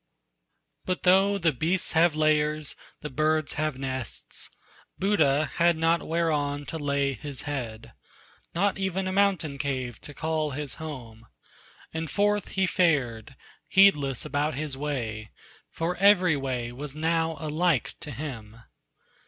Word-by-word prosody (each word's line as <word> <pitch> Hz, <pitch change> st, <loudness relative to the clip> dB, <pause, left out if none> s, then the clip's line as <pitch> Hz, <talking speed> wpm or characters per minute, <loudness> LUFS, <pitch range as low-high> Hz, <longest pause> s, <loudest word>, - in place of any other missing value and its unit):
But 185 Hz, -1 st, -2 dB
though 195 Hz, +2 st, +5 dB
the 170 Hz, -4 st, +2 dB
beasts 165 Hz, +7 st, 0 dB
have 165 Hz, -1 st, +4 dB
lairs, 155 Hz, -1 st, +1 dB, 0.3 s
the 150 Hz, -, -5 dB
birds 155 Hz, +2 st, +1 dB
have 155 Hz, -2 st, -1 dB
nests, 130 Hz, -3 st, -5 dB, 0.5 s
Buddha 155 Hz, -7 st, +3 dB
had 170 Hz, -1 st, +4 dB
not 165 Hz, +1 st, +2 dB
whereon 150 Hz, -3 st, 0 dB
to 160 Hz, -, -3 dB
lay 140 Hz, -1 st, 0 dB
his 140 Hz, 0 st, -7 dB
head, 125 Hz, -7 st, -5 dB, 0.6 s
Not 195 Hz, +3 st, +1 dB
even 190 Hz, 0 st, -1 dB
a -, -, -1 dB
mountain 185 Hz, -8 st, +1 dB
cave 130 Hz, -5 st, -3 dB
to 145 Hz, -, -10 dB
call 155 Hz, 0 st, -1 dB
his 145 Hz, -2 st, -3 dB
home; 120 Hz, -7 st, -8 dB, 0.7 s
And 160 Hz, 0 st, -3 dB
forth 205 Hz, +4 st, +1 dB
he 190 Hz, -, +4 dB
fared, 135 Hz, -11 st, +1 dB, 0.3 s
heedless 150 Hz, -, +4 dB
about 145 Hz, +1 st, -1 dB
his 145 Hz, -1 st, -3 dB
way 120 Hz, -7 st, -3 dB, 0.4 s
For 170 Hz, +2 st, -2 dB
every 185 Hz, -4 st, +5 dB
way 130 Hz, -4 st, -3 dB
was 140 Hz, +3 st, -6 dB
now 160 Hz, +1 st, 0 dB
alike 155 Hz, -2 st, +1 dB
to 150 Hz, -, -7 dB
him. 115 Hz, -6 st, -7 dB
155 Hz, 135 wpm, -27 LUFS, 135-170 Hz, 0.7 s, though